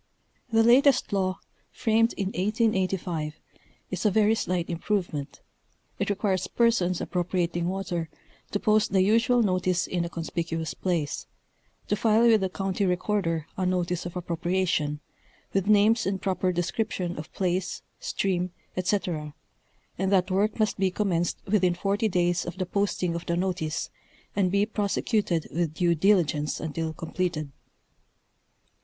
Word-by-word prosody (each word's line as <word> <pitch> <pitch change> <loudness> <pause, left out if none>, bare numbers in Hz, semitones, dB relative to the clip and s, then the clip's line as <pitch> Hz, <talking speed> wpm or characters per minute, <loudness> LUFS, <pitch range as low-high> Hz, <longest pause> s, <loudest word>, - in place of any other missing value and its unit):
The 225 0 +5
latest 250 0 +5
law, 185 -1 +1 0.3
framed 230 -1 +2
in 195 -2 -2
1885, 190 -6 0 0.6
is 185 -1 -3
a 215 - +5
very 215 +2 +4
slight 180 -5 -1
improvement; 170 -4 -2 0.6
it - - 0
requires 195 -2 0
persons 205 -7 +2
appropriating 175 -1 -1
water, 180 -4 -3 0.4
to 205 - -1
post 215 -2 +2
the 190 -1 +5
usual 230 +4 +3
notice 185 -2 +1
in 175 -2 -1
a 170 - -3
conspicuous 165 -2 -3
place; 170 -6 -2 0.6
to 210 - +1
file 220 +2 +3
with 225 -3 +5
the 190 - 0
county 195 +1 -2
recorder 180 -3 0
a 190 - -1
notice 180 -1 0
of 175 - -9
appropriation, 170 -3 -1 0.5
with 195 0 +1
names 215 +1 +4
and 195 -1 -1
proper 185 -1 0
description 175 0 -2
of 155 - -8
place, 185 -1 -1 0.2
stream, 180 -2 -1 0.3
etc., 180 -5 -1 0.6
and 190 +1 +1
that 190 -1 +3
work. 205 +3 +1
must 215 -3 0
be 190 -1 +3
commenced 180 -3 0
within 185 -3 +2
forty 200 +4 0
days 175 -2 +1
of 175 +1 -6
the 185 - -1
posting 185 -2 0
of 170 0 -5
the 170 - 0
notice 180 -4 -2 0.4
and 195 -2 +2
be 200 +1 +3
prosecuted 205 -4 0
with 165 -2 -1
due 175 -1 +3
diligence 165 -4 +2
until 160 +1 -3
completed. 160 -2 -3
185 Hz, 140 wpm, -27 LUFS, 175-205 Hz, 0.6 s, The